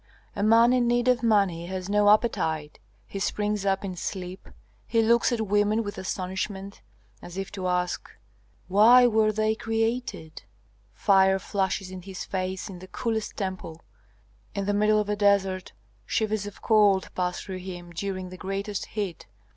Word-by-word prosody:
A 200 - -3
man 230 +3 +5
in 245 -1 +2
need 240 +1 +1
of 250 -2 +3
money 200 -7 +2
has 185 0 -5
no 205 0 +3
appetite, 160 -9 +1 0.3
he 195 - -6
springs 210 0 -1
up 195 +1 +1
in 185 -2 -5
sleep, 185 +1 -6 0.4
he 230 -1 +2
looks 235 +3 +3
at 235 -2 0
women 210 +1 +2
with 205 -1 -6
astonishment, 190 - -4 0.4
as 175 +1 -10
if 195 0 -4
to 190 -2 -4
ask, 180 0 -1 0.6
'Why 225 +6 +7
were 220 -2 +3
they 215 +1 +1
created?' 225 -7 -3 0.5
Fire 190 -1 +4
flashes 190 -1 -2
in 185 -1 -7
his 190 0 -7
face 190 +1 -3
in 190 -3 -9
the 185 - -11
coolest 225 0 -3
temple. 185 -4 -5 0.7
In 200 -1 -2
the 205 - 0
middle 210 +1 +3
of 210 - -1
a 210 - 0
desert 200 -2 +1 0.4
shivers 215 -2 -1
of 205 - -11
cold 205 -4 +3
pass 180 -1 -2
through 190 -1 -6
him 175 -2 -8
during 185 +1 -4
the 185 - -10
greatest 195 +2 -4
heat. 200 -6 -5
200 Hz, 165 wpm, -26 LUFS, 185-215 Hz, 0.7 s, Why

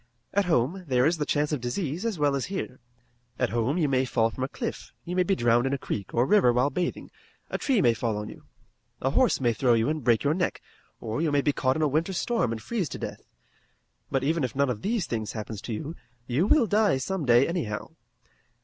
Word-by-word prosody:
At 200 0 +2
home 170 +3 +1
there 125 -1 +3
is 165 +3 +2
the 150 - -1
chance 150 0 +1
of 150 -5 -1
disease 155 - -2
as 220 -5 -2
well 145 -2 +2
as 135 - -1
here. 190 -9 -5 0.6
At 125 - 0
home 120 +7 0
you 160 -4 +2
may 130 -1 +2
fall 115 -3 +1
from 130 - -5
a - - 0
cliff, - - -5
you 180 - -4
may 185 - +3
be 190 +2 +2
drowned 120 -2 +3
in 135 - -1
a - - -3
creek 100 -7 -5
or 120 +2 +2
river 205 -8 +5
while 125 +4 +2
bathing, 180 -1 -3 0.4
a - - -2
tree 255 -8 +2
may 120 - +5
fall 115 -1 -2
on 105 0 -4
you, - - -12 0.5
a - - 0
horse - - +3
may 120 -3 +2
throw 120 +1 +3
you 115 +3 +1
and 155 -2 -2
break 115 -2 +3
your 145 +1 +2
neck, 175 0 -1 0.4
or 115 +5 -3
you 160 -2 +1
may 145 0 +3
be 145 - +1
caught 130 0 +1
in 155 - 0
a - - +4
winter 160 +7 0
storm 210 - 0
and 110 -1 -5
freeze 210 -9 -2
to - - -6
death. - - -6 0.9
But 135 -1 0
even 160 +2 +1
if 130 - -2
none 140 -1 +2
of 105 - -5
these 215 -4 0
things 110 -6 -3
happens 110 -1 -6
to - - -6
you, 155 +9 -5 0.3
you 130 +10 +1
will 270 +1 +5
die 210 -7 +3
some 190 +6 -3
day 120 0 +5
anyhow. 120 - -3
140 Hz, 240 wpm, -27 LUFS, 120-175 Hz, 0.9 s, river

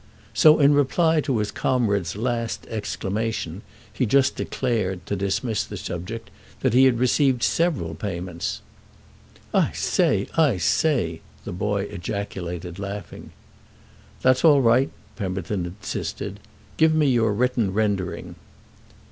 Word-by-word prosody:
So 155 0 +7
in 145 0 +6
reply 155 +3 +3
to 135 -5 -1
his 105 -1 -1
comrade's 100 -8 0
last 115 +1 -2
exclamation 105 -3 -3 0.3
he 125 - 0
just 135 +4 +3
declared, 105 -8 -2
to 100 - -2
dismiss 100 +3 -1
the - - -7
subject, 90 +7 -6 0.3
that - - +1
he 130 +2 +6
had 130 -3 +4
received 125 0 +2
several 155 - +1
payments. 85 -1 -4 0.9
"I - - +2
say—I 150 - +1
say!" 85 - +1 0.2
the - - -5
boy 100 +2 -1
ejaculated, 90 -3 -5
laughing. 100 0 -7 0.9
"That's 130 0 +4
all 145 -5 +6
right," 125 +4 +4 0.3
Pemberton 95 -2 -3
insisted. 95 +5 -5 0.4
"Give 160 0 +4
me 155 -1 +3
your 120 -5 +3
written 120 -2 +1
rendering." 100 -3 -2
110 Hz, 120 wpm, -24 LUFS, 95-130 Hz, 0.9 s, So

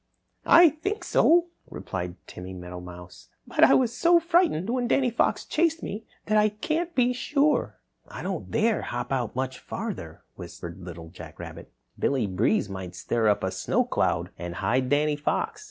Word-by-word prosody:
"I 340 0 +8
think 370 +9 -4
so," 345 +1 +4 0.2
replied 90 -1 -5
Timmy 95 +1 -9
Meadowmouse, 90 0 -10 0.2
"but - - +1
I - - +7
was 240 -2 +2
so 340 +5 +5
frightened 335 - +2
when 245 -1 0
Danny 255 0 +2
Fox 235 - +1
chased 330 0 +1
me 215 +2 -5 0.2
that 215 0 +3
I 210 0 +4
can't 320 +11 -3
be 250 -1 +3
sure." 290 +4 +1 0.3
"I - - -8
don't - - -4
dare 225 -1 +1
hop 120 +1 -4
out 125 -4 -1
much 130 0 -3
farther," - - -6
whispered 85 +1 -9
Little 85 -2 -9
Jack 85 -3 -11
Rabbit. - - -9 0.3
"Billy 130 -5 +1
Breeze 100 +2 +1
may 95 -2 -6
stir 115 +5 -1
up 105 -1 +2
a 95 - 0
snow - - 0
cloud - - 0
and 85 0 -5
hide 125 +6 0
Danny 150 +1 +2
Fox. 430 - -1
145 Hz, 170 wpm, -26 LUFS, -, 0.3 s, I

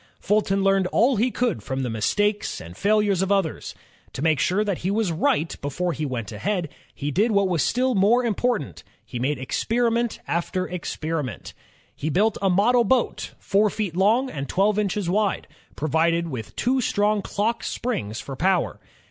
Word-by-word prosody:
Fulton 195 -1 +1
learned 195 -1 +3
all 245 +7 +3
he 235 +5 +2
could 245 - -1
from 130 +5 -3
the - - -1
mistakes 205 - 0
and 85 +2 -10
failures 205 - +2
of 190 +1 0
others. 195 -6 -1 0.4
To 140 - -4
make 160 -3 +3
sure 195 +4 +2
that 200 -4 -2
he 185 - -2
was 205 -2 0
right 160 0 0
before 170 +5 -2
he 155 0 -3
went 115 -6 -4
ahead, 185 -6 -2 0.3
he 145 +1 -3
did 205 - +2
what 200 -3 +3
was 175 -5 0
still 255 - +1
more 225 +5 +3
important, 235 - -1 0.2
he 125 - -6
made 135 +4 0
experiment 230 - 0
after 180 +2 -1
experiment. 160 -5 -4 0.4
He 155 - -3
built 205 +7 +2
a 195 - +2
model 230 +7 +4
boat, 245 +2 0
four 210 +2 +2
feet 200 -4 -3
long 220 +8 +3
and 140 -1 -5
twelve 200 +3 +2
inches 205 -2 -1
wide, 200 +2 0 0.3
provided 165 +2 +1
with 115 -6 -7
two 260 +1 +1
strong 210 -2 +1
clock 220 +4 -1
springs 115 - -3
for 135 - -7
power. 185 +4 +1
195 Hz, 175 wpm, -24 LUFS, 160-215 Hz, 0.4 s, model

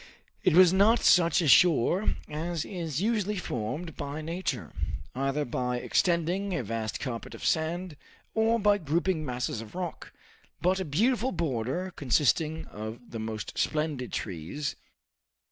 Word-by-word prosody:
It 180 - +4
was 180 -1 +8
not 210 +5 +5
such 170 -3 +5
a - - +1
shore 170 - +5
as 160 +1 -3
is 170 -4 -3
usually 210 -2 0
formed 150 - -4
by 145 +2 -5
nature, 165 - -3 0.4
either 135 +3 -1
by 125 0 -1
extending 180 +6 +1
a 155 - -1
vast 110 0 -3
carpet 120 -4 -5
of - - -8
sand, 165 +1 0 0.4
or 225 +1 +3
by 205 -1 +4
grouping 165 +1 0
masses 125 -4 -3
of 110 +5 -11
rock, 180 -2 -5 0.5
but 185 +2 +2
a 190 - -2
beautiful 230 - +1
border 165 +3 -2
consisting 150 +4 +1
of 110 +3 -8
the 115 - -5
most 110 -1 -5
splendid 150 -5 -1
trees. 100 - -4
160 Hz, 140 wpm, -28 LUFS, 125-185 Hz, 0.5 s, was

